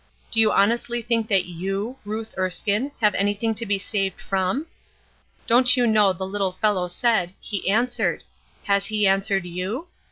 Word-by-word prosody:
Do 225 - +1
you 220 -1 +5
honestly 235 +3 +1
think 230 -1 +1
that 195 -4 +2
you, 195 +7 -4
Ruth 220 +2 -5
Erskine, 200 +7 0
have 210 -1 +4
anything 205 +3 0
to 225 +1 -5
be 200 0 +2
saved 195 -1 -2
from? 195 +10 -1 0.8
Don't 250 +2 +5
you 245 - +3
know 215 -3 +4
the 190 +1 -4
little 195 -1 -2
fellow 185 -2 +1
said, 180 -1 0
'He 200 -2 -3
answered.' 240 +4 0 0.4
Has 200 -1 +1
He 210 -1 +1
answered 195 -1 +1
you? 190 - -4
205 Hz, 160 wpm, -23 LUFS, 190-225 Hz, 0.8 s, you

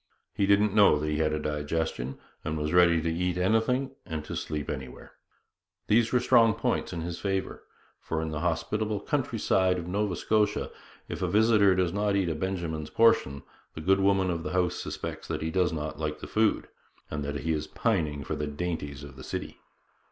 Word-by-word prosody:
He 100 - +1
didn't 100 0 +4
know 100 -7 +6
that 75 +1 -3
he 75 0 0
had 80 -1 +2
a 75 - 0
digestion, 75 -3 -2 0.3
and 80 - -2
was 75 +1 -2
ready 85 -2 +5
to 85 0 0
eat 90 +1 -1
anything 115 +8 +1
and 80 -4 -5
to - - -5
sleep 75 -2 -4
anywhere. 65 -1 -7 0.7
These 115 +2 +3
were 125 - +4
strong 115 -2 +5
points 115 +2 -1
in 85 -2 -4
his 85 +1 -5
favour; 95 -1 -2 0.4
for 80 - -3
in 80 0 -3
the 75 - -3
hospitable 105 +6 -1
countryside 115 -9 +1
of 85 - -5
Nova 100 +1 -1
Scotia, 105 +3 +1 0.4
if - - -6
a 90 - +1
visitor 105 0 +4
does 90 -2 +1
not 100 0 +1
eat 95 -3 +1
a - - 0
Benjamin's 80 -3 -3
portion, 70 -12 +3 0.3
the 80 - -6
good 95 +4 +3
woman 95 -1 +3
of 85 -1 -2
the 80 - -5
house 90 -2 +2
suspects - - -5
that - - -3
he 80 - -2
does 90 -1 +2
not 75 -1 -4
like 75 -1 -2
the - - -7
food, 110 0 +1 0.4
and 75 -1 -3
that 70 0 -3
he 80 +1 0
is 75 0 -3
pining 80 - -1
for - - -3
the 75 - -3
dainties 75 -2 -4
of 70 -2 -11
the 65 - -9
city. - - -5
90 Hz, 200 wpm, -28 LUFS, 75-100 Hz, 0.7 s, know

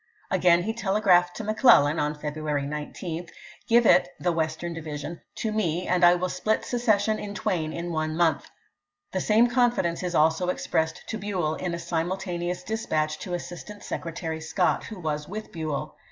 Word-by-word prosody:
Again 175 -1 +4
he 220 - -1
telegraphed 190 -5 +3
to 220 - -5
McClellan 160 - +4
(February 150 -1 -3
19), 160 +4 -5 0.2
" - - -22
Grive 235 0 +5
it 180 - +6
[the 175 - +1
Western 165 +1 -2
division] 155 0 -6
to 220 - -2
me, 180 -5 0
and 180 0 +2
I 175 0 +8
will 180 +1 -1
split 215 +4 -1
secession 220 -3 +1
in 205 0 -6
twain 160 -6 -1
in 170 +1 -4
one 155 -1 -2
month." 170 -2 +1 0.6
The 185 - -1
same 220 +4 +4
confidence 240 -8 +1
is 180 -1 -2
also 160 +3 +3
ex 180 - -2
pressed 160 0 -1
to 220 - -3
Buell, 185 -7 -1
in 175 +1 -3
a - - -4
simultaneous 175 +1 -2
dispatch 155 -8 -1
to 180 - -3
Assistant 180 +4 -8
Secretary 160 -1 -4
Scott, 165 +3 0
who 215 -4 -8
was 150 -3 -3
with 215 +3 -6
Buell. 155 -6 -4
175 Hz, 170 wpm, -26 LUFS, 160-205 Hz, 0.6 s, I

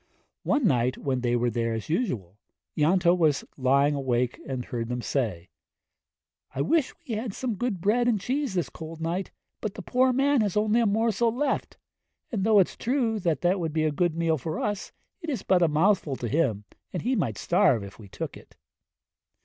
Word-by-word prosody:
One 285 -4 +1
night 125 - +2
when 130 -2 -2
they 120 -1 +1
were 120 0 +1
there 115 0 -1
as 110 - -5
usual, 120 - -2 0.4
Ianto 175 +3 +4
was 155 -6 +2
lying 140 +2 +3
wide - - -2
awake 125 -2 0
and 130 -2 -3
heard 115 -1 -4
them 125 -1 -3
say, 105 -11 -2 1.1
'I 135 - 0
wish 275 - +2 0.2
we 235 - -3
had 220 -1 -3
some 255 -3 -2
good 215 -2 -2
bread 235 +6 +2
and 225 -4 +2
cheese 255 +1 -2
this 175 - 0
cold 160 0 -9
night, 170 +4 -2 0.3
but 215 -2 -4
the - - -7
poor 255 +1 +3
man 275 0 +3
has 205 -2 0
only 215 +2 +3
a 230 - +3
morsel 225 +2 +2
left; 265 +3 -2 0.5
and 210 -6 -1
though 215 0 +4
it's 190 - +3
true 235 -3 0
that 175 +2 +1
would 165 -3 -2
be 160 -1 +1
a 155 - +2
good 170 +2 0
meal 165 -2 +1
for 155 +5 -4
us, 205 -2 -3 0.3
it 330 - -5
is 255 -9 -2
but 185 -2 +3
a 170 - +5
mouthful 155 -1 +2
to 120 - -4
him, 120 -7 +1 0.3
and 180 - -4
he 255 +4 +1
might 115 - -1
starve 115 -6 +3
if 100 +2 -11
we 105 - -11
took - - -6
it.' - - -16
170 Hz, 200 wpm, -27 LUFS, 130-220 Hz, 1.1 s, a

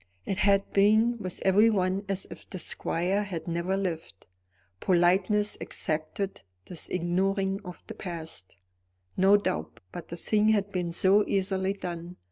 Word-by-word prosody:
It 195 - -2
had 200 -1 +2
been 220 +4 +4
with 185 -4 -4
everyone 195 -1 +3
as 195 -1 0
if - - -11
the 190 - -6
squire 180 +3 0
had 175 -5 -6
never 170 +3 -1
lived. 165 - -4 0.5
Politeness 185 - +2
exacted 160 +4 -3 0.2
this 175 - -6
ignoring 190 +2 0
of 180 -2 -10
the 220 - -8
past, 165 - -7 0.6
no 195 +2 +6
doubt; 80 - -3
but 175 - -8
the 170 - -7
thing 215 +4 +2
had 205 -2 +2
been 180 -3 -2
so 195 +4 +5
easily 190 0 0
done. 175 -2 -6
190 Hz, 140 wpm, -28 LUFS, 175-200 Hz, 0.6 s, no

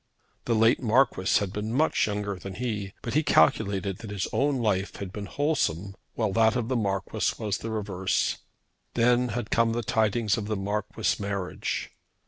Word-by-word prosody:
The 115 - +1
late 115 +3 +4
Marquis 120 -5 +3
had 100 -2 -3
been 105 +1 -3
much 150 +1 +2
younger 105 -1 -2
than 95 +1 -8
he, 105 -5 -3
but 115 - -3
he 155 - +4
calculated 100 - +2
that 110 - -8
his 100 -2 -2
own 140 0 +2
life 105 -5 0
had 95 -2 -6
been 105 -1 -5
wholesome 100 - 0 0.2
while 110 -4 0
that 110 0 +4
of 120 -2 -1
the 130 - +1
Marquis 100 -4 0
was 105 -2 -2
the 115 - -5
reverse. 95 -4 -1 0.6
Then 120 +1 +3
had 120 -1 -4
come 115 0 +3
the 120 0 -2
tidings 110 +1 +1
of 105 - -5
the 110 -1 -1
Marquis' 105 +1 -1
marriage. 100 -2 -3
105 Hz, 175 wpm, -27 LUFS, 100-115 Hz, 0.6 s, late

